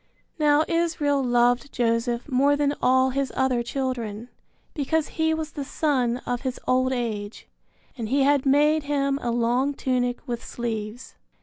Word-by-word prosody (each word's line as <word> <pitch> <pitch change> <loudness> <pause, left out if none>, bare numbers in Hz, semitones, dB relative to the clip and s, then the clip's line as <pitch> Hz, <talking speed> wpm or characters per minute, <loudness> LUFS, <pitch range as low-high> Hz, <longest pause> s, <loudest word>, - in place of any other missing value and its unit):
Now 300 0 +4
Israel 325 -4 +1
loved 245 +2 +2
Joseph 235 0 0
more 280 +1 +3
than 285 0 +1
all 260 +1 +3
his 275 0 -1
other 255 -2 +1
children, 240 -3 -4 0.4
because 310 +1 -1
he 320 0 0
was 315 0 -3
the 285 - -5
son 260 -4 0
of 245 0 -2
his 260 -1 -4
old 255 0 +2
age; 220 -4 -4 0.5
and 225 -4 -5
he 275 +2 +2
had 280 -1 +3
made 295 +2 +3
him 275 -1 0
a 240 - -2
long 240 +4 +1
tunic 250 +1 -1
with 240 -1 -4
sleeves. 225 0 -5
260 Hz, 150 wpm, -24 LUFS, 240-285 Hz, 0.5 s, Now